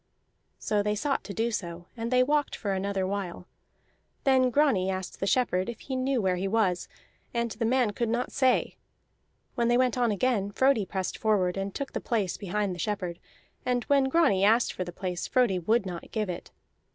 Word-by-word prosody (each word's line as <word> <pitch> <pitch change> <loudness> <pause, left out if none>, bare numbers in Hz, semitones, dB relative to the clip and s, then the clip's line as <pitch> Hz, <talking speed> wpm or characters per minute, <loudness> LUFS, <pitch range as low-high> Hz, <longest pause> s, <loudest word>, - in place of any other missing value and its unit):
So 210 -1 0
they 210 +1 0
sought 275 +6 -1
to - - -6
do 230 +3 -1
so, 175 -5 -4
and 230 -1 -3
they 255 0 +4
walked 295 +2 +1
for 200 -3 -2
another 195 0 -1
while. 190 -2 -4 0.8
Then 260 -2 +4
Grani 250 -9 +2
asked 185 -1 -4
the 195 - -1
shepherd 195 -6 +1
if 235 - -7
he 265 - -4
knew 260 0 +1
where 185 -3 +1
he 190 +2 -1
was, 195 -4 +1 0.5
and 235 -1 0
the 230 +2 -2
man 245 -2 +2
could 230 +2 -2
not 240 +2 -1
say. 260 -2 +2 0.8
When 235 -2 +1
they 240 0 +4
went 250 -1 +2
on 240 -1 +3
again, 210 -1 +1
Frodi 255 -3 +2
pressed 190 -1 -3
forward 195 -5 +2
and 195 0 -4
took 280 -1 -4
the - - -3
place 210 -6 -1
behind 200 0 -2
the 175 - -8
shepherd; 180 -3 -3 0.4
and 245 -1 0
when 280 -1 +3
Grani 265 - +3
asked 225 +4 +4
for 185 - -3
the 175 - -7
place 180 0 -4
Frodi 240 -8 +2
would 215 +4 +1
not 175 -2 -6
give 215 -4 -2
it. 175 - -8
215 Hz, 200 wpm, -28 LUFS, 190-250 Hz, 0.8 s, they